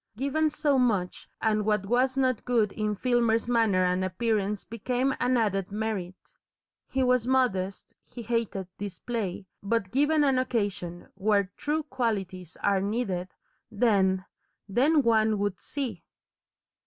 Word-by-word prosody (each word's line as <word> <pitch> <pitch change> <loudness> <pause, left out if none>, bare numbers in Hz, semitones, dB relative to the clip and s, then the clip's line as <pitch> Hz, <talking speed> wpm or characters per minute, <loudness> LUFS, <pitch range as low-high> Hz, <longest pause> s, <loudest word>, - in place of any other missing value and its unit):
Given 280 +5 +1
so 290 -2 +1
much, 205 -8 0
and 215 -1 +2
what 210 -1 +1
was 255 +5 +1
not 255 -3 +1
good 230 -5 +2
in 210 -1 -2
Filmer's 235 0 +1
manner 225 -6 +3
and 180 +1 +1
appearance 205 +1 -1
became 250 +4 -1
an 250 0 +2
added 195 -4 0
merit. 205 -4 -4 0.6
He 265 0 0
was 250 -2 +2
modest, 200 -8 0
he 240 - -9
hated 225 -4 -1
display, 200 0 -4 0.2
but 200 -2 -1
given 295 +3 +3
an 270 -3 +3
occasion 200 -8 -2
where 200 -1 +1
TRUE 305 +1 -1
qualities 200 - -3
are 195 -1 +3
needed, 195 -4 -2 0.4
then 195 -4 +2 0.4
then 280 +9 +3
one 220 -2 +3
would 200 -2 -2
see! 275 -4 -4
220 Hz, 130 wpm, -27 LUFS, 195-250 Hz, 0.6 s, manner